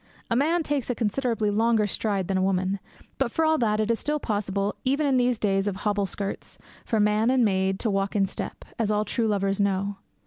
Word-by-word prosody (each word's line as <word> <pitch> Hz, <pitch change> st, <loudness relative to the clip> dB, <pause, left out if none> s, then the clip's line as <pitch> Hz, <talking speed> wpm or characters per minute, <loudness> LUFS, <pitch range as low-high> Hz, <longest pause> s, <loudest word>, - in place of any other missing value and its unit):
A -, -, +3 dB
man 320 Hz, +6 st, +2 dB
takes 290 Hz, -5 st, -2 dB
a 245 Hz, -, 0 dB
considerably 225 Hz, -1 st, 0 dB
longer 225 Hz, 0 st, +3 dB
stride 200 Hz, -2 st, -1 dB
than 195 Hz, -, -1 dB
a -, -, +1 dB
woman; 190 Hz, +1 st, 0 dB, 0.4 s
but, 265 Hz, -3 st, +1 dB
for 320 Hz, -, +1 dB
all 315 Hz, 0 st, +3 dB
that, 215 Hz, -3 st, +1 dB
it 215 Hz, +1 st, +1 dB
is 230 Hz, -, 0 dB
still 300 Hz, 0 st, -1 dB
possible, 205 Hz, -4 st, -1 dB
even 280 Hz, +3 st, +1 dB
in 270 Hz, -2 st, +3 dB
these 245 Hz, -1 st, +2 dB
days 195 Hz, -1 st, +1 dB
of 200 Hz, -, -1 dB
hobble 205 Hz, 0 st, 0 dB
skirts, 200 Hz, +1 st, -5 dB, 0.3 s
for 220 Hz, -, 0 dB
man 210 Hz, +2 st, +3 dB
and 255 Hz, -2 st, +4 dB
maid 190 Hz, -1 st, +1 dB
to 225 Hz, -, 0 dB
walk 195 Hz, +1 st, -1 dB
in 200 Hz, -2 st, +3 dB
step, 195 Hz, -, -6 dB
as 220 Hz, -2 st, +1 dB
all 210 Hz, 0 st, +1 dB
true 225 Hz, +2 st, 0 dB
lovers 195 Hz, -1 st, 0 dB
know. 200 Hz, 0 st, 0 dB
210 Hz, 220 wpm, -26 LUFS, 195-240 Hz, 0.4 s, and